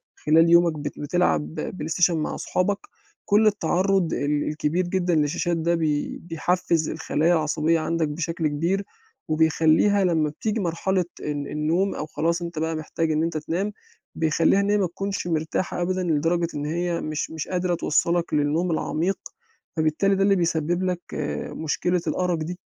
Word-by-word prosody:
خلال 165 +2 +4
يومك 170 -2 +4
بت 145 0 -5
بتلعب 80 - 0
PlayStation 175 +3 +2
مع 155 -2 -2
أصحابك، 200 +2 0 0.5
كُلّ 215 +1 +4
التعرُّض 190 -2 +1
ال 145 +1 0
الكبير 155 +4 -1
جدًا 180 -1 +1
للشاشات 155 +3 +1
ده، 170 +1 +1
بي 155 -3 -1
بيحفّز 165 -1 0
الخلايا 160 +1 +1
العصبية 160 +1 +1
عندك 165 0 0
بشكل 165 +1 -2
كبير، 170 +7 0 0.5
وبيخليها 160 +5 +3
لمّا 160 -4 +2
بتيجي 215 +9 -2
مرحلة 180 +1 0 0.2
ال 145 -1 -3
النوم 165 +6 0
أو - - -3
خلاص 170 +2 -1
أنت 170 -2 -4
بقى 160 +1 -1
محتاج 160 +1 -2
إن 155 +1 +1
أنت 165 -1 -1
تنام، 175 +7 -2 0.4
بيخلّيها 160 +4 +3
إن 200 - 0
هي 210 - +3
ما 195 -3 +1
تكونش 195 +2 -4
مرتاحة 165 +2 -1
أبدًا 185 +1 0
لدرجة 165 +1 +1
إن 145 0 -3
هي 170 +2 -1
مش 155 0 -3
مش 160 -1 -5
قادرة 180 -1 0
توصَّلك 170 +2 +1
للنوم 155 +4 +1
العميق، 165 +4 -1 0.6
فبالتالي 160 +6 +2
ده 195 - +2
اللي 200 0 +4
بيسبِّب 170 0 0
لك 180 -1 -1
آآ، 75 0 -3
مشكلة 175 +3 -1
الأَرَق 180 +2 0
دي. 165 +3 -5
165 Hz, 160 wpm, -24 LUFS, 155-180 Hz, 0.6 s, خلال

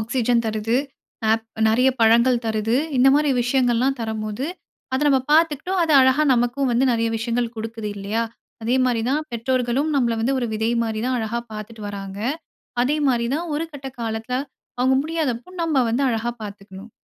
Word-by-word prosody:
Oxygen 235 +1 +1
தருது, 220 +2 0 0.5
app 225 0 +1 0.2
நெறைய 250 +4 +4
பழங்கள் 235 +2 +4
தருது, 220 +1 0 0.2
இந்த 260 +2 +6
மாரி 295 -1 +3
விஷயங்கள்லாம் 250 +1 +1
தரம்போது 220 +3 -3 0.5
அதை 265 - 0
நம்ம 270 -2 +4
பார்த்துக்கிட்டோம். 330 +4 +2
அது 315 - +1
அழகா 260 +3 +4
நமக்கும் 245 +2 0
வந்து 250 +3 +3
நெறைய 230 0 +1
விஷயங்கள் 235 +1 -2
கொடுக்குது 225 -1 -5
இல்லையா! 205 +4 -1 0.4
அதே 240 +3 +1
மாரி 245 -3 +1
தான் 305 +2 0
பெற்றோர்களும் 255 +4 0
நம்மள 235 -3 +2
வந்து 265 +4 +1
ஒரு 240 - -1
விதை 220 +2 0
மாரி 220 -1 -3
தான் 255 - 0
அழகா 225 +1 -2
பார்த்துட்டு 215 +1 -8
வராங்க. 195 -1 -7 0.6
அதே 290 +4 +1
மாரி 235 -2 +1
தான் 340 +3 -2
ஒரு 330 - -2
கட்ட 275 -1 -8
காலத்தில 225 +2 -3 0.4
அவங்க 260 +1 +3
முடியாதப்போ 310 -3 -2
நம்ம 320 -3 0
வந்து 240 +5 0
அழகா 235 0 -1
பார்த்துக்கணும். 200 +1 -10
235 Hz, 160 wpm, -22 LUFS, 225-265 Hz, 0.6 s, இந்த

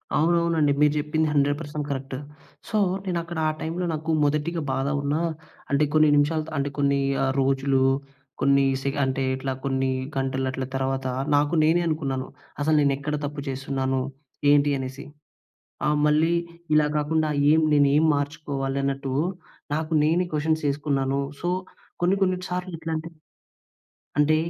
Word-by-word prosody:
అవునవునండి. 165 -2 +3
మీరు 150 -1 +5
చెప్పింది 155 +1 0
100% 145 +1 0
కరెక్ట్. 135 -1 -4 0.5
సో, 215 - 0 0.3
నేనక్కడ 170 -2 -3
ఆ - - +1
టైంలో 170 +3 -2
నాకు 160 +1 -2
మొదటిగ 150 +4 0
బాధ 135 +1 -1
ఉన్నా, 145 +3 0 0.5
అంటే 140 +2 +3
కొన్ని 155 -1 +5
నిమిషాలు 150 +2 +2
త - - -7
అంటే 140 +1 0
కొన్ని 140 -1 +2 0.2
ఆహ్, 135 - +2
రోజులు 135 0 +2 0.6
కొన్ని 140 0 +4 0.2
సే 140 - 0
అంటే 130 0 0
ఇట్లా, 135 0 -3
కొన్ని 135 -1 0 0.3
గంటలట్ల 130 0 -1
తర్వాత, 135 0 -1 0.3
నాకు 145 +2 +2
నేనే 165 +3 +4
అనుకున్నాను. 135 -5 -2 0.3
అసలు 155 +2 +3
నేనెక్కడ 140 +1 0
తప్పు 145 0 -5
చేసున్నాను? 135 0 -1 0.5
ఏంటి? 145 0 +4
అనేసి. 130 +1 -6 0.8
ఆహ్, 150 0 +2
మళ్ళీ 155 +3 +3 0.4
ఇలా 150 -1 +5
కాకుండా 155 +1 +1 0.2
ఏం 160 - +4
నేనేం 145 +1 +4
మార్చుకోవాలన్నట్టు, 140 -2 -2 0.6
నాకు 160 +1 -3
నేనే 170 +4 +2
క్వషన్సేసుకున్నాను. 145 -3 0 0.2
సో, 175 - -1 0.5
కొన్ని 180 +2 +4
కొన్ని 185 -1 +1
సార్లిట్లాంటి 165 -3 -4 1.1
అంటే, 150 +1 +4
145 Hz, 125 wpm, -25 LUFS, 135-160 Hz, 1.1 s, మీరు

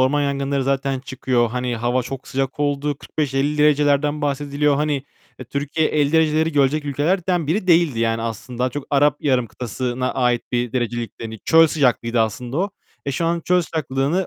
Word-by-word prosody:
orman 140 +3 +3
yangınları 140 -1 -1
zaten 135 0 0
çıkıyor. 130 -2 0
Hani, 125 0 -2
hava 120 +2 0
çok 130 +2 -7
sıcak 135 +1 -2
olduğu 145 0 0
45-50 145 0 -1
derecelerden 150 0 +3
bahsediliyor. 145 0 0
Hani, 145 -2 0 0.5
Türkiye 145 +3 0
50 145 -1 +1
dereceleri 160 0 +3
görecek 145 +1 +2
ülkelerden 165 +4 0
biri 185 +4 0
değildi. 165 -8 +4
Yani, 115 0 0
aslında 115 +2 -6
daha 125 - +2
çok 145 +2 -6
Arap 145 0 +3
Yarım 130 -4 +1
Kıtası'na 125 +2 -3
ait 125 -2 +1
bir 120 -1 -1
derecelikti, 120 -2 -3
hani. 110 -1 -7
Çöl 165 0 +6
sıcaklığıydı 125 -6 +1
aslında 120 +4 -2
o. 195 +3 0 0.4
E, 140 - -1
şu 165 +4 -1
an 170 +1 0
çöl 180 +1 +2
sıcaklığını, 155 +3 -1
140 Hz, 170 wpm, -21 LUFS, 125-150 Hz, 0.5 s, Çöl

